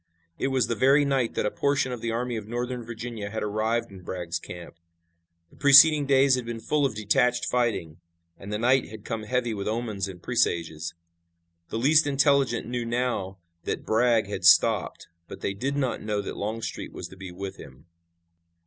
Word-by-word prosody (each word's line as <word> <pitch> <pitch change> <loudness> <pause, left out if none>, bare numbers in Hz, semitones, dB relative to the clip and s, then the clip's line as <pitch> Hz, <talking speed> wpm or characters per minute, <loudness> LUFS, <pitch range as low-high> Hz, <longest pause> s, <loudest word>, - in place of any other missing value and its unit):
It - - 0
was 130 -3 +1
the 115 - -1
very 135 +6 +4
night 135 -4 0
that - - 0
a 105 - 0
portion 140 -2 0
of 120 -2 -5
the 115 - -2
Army 120 +1 -2
of 110 -2 -6
Northern 120 +1 -4
Virginia 115 -2 -6
had 110 +1 -4
arrived 110 +2 -1
in 95 -1 -11
Bragg's 85 -2 -4
camp. 85 0 -10 0.8
The - - -20
preceding 145 +1 +7
days 135 0 +4
had 125 -1 +1
been 115 -1 -6
full 145 +4 +1
of 120 - -8
detached 110 +4 +1
fighting, 110 -10 -1 0.4
and 100 +1 -10
the 105 - -1
night 125 +3 +2
had 110 -1 -11
come 115 -2 -3
heavy 125 0 -1
with 100 -1 -4
omens 110 -3 -2
and 95 -2 -9
presages. 85 -1 -1 0.7
The - - -3
least 145 +5 +4
intelligent 140 -4 +2
knew 120 0 -3
now 115 -5 -2 0.3
that - - -3
Bragg 115 0 +3
had 100 -2 -6
stopped, 85 -1 +4 0.2
but - - -10
they 95 - -2
did 135 +8 -3
not 130 -3 -1
know 105 -1 -2
that - - -6
Longstreet 110 +2 -5
was - - -7
to - - -13
be 95 -1 -9
with 95 +2 -7
him. 65 +4 -14
115 Hz, 190 wpm, -26 LUFS, 100-125 Hz, 0.8 s, preceding